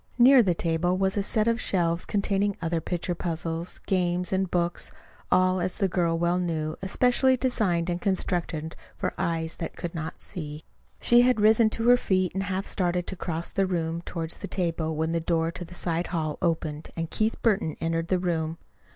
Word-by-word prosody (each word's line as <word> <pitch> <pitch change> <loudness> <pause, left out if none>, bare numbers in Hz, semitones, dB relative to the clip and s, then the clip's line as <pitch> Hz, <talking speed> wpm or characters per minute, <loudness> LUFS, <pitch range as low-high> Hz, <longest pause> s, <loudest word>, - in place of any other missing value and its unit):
Near 255 +1 +8
the 185 -6 +1
table 170 +2 0
was 190 0 +1
a 205 - +1
set 215 +2 +1
of 230 0 +1
shelves 170 -2 0
containing 200 0 0
other 165 0 -1
picture 175 +1 -2
puzzles, 165 0 -3
games, 180 -1 0
and 190 -1 +1
books 175 -1 -1 0.4
all, 185 0 +3
as 180 +1 0
the 195 - +2
girl 170 -2 +1
well 175 +1 +1
knew, 160 -3 -2
especially 250 +6 +3
designed 200 -10 +1
and 175 0 -2
constructed 175 -5 -1 0.2
for - - -2
eyes 165 -1 -1
that 165 - -5
could 175 - -5
not 160 -1 -5
see. 155 -4 -4 0.4
She 240 0 +5
had 250 -2 +3
risen 220 +1 +5
to 225 +1 -1
her 245 0 +7
feet 185 -6 0
and 195 - -1
half 195 0 -2
started 180 -2 0
to 190 - -4
cross 170 -1 -3
the 195 -1 +1
room 165 -2 -2
toward 165 -2 -5
the - - -4
table 165 -3 -1
when 160 +1 -1
the 170 - +1
door 165 0 0
to 175 - -6
the 175 +1 -10
side 170 0 -1
hall 155 -4 -2
opened 160 -3 -1
and 165 -1 -3
Keith 220 +1 0
Burton 205 -8 +1
entered 165 0 -1
the 185 - +2
room. 165 -3 -1
175 Hz, 195 wpm, -26 LUFS, 165-195 Hz, 0.4 s, Near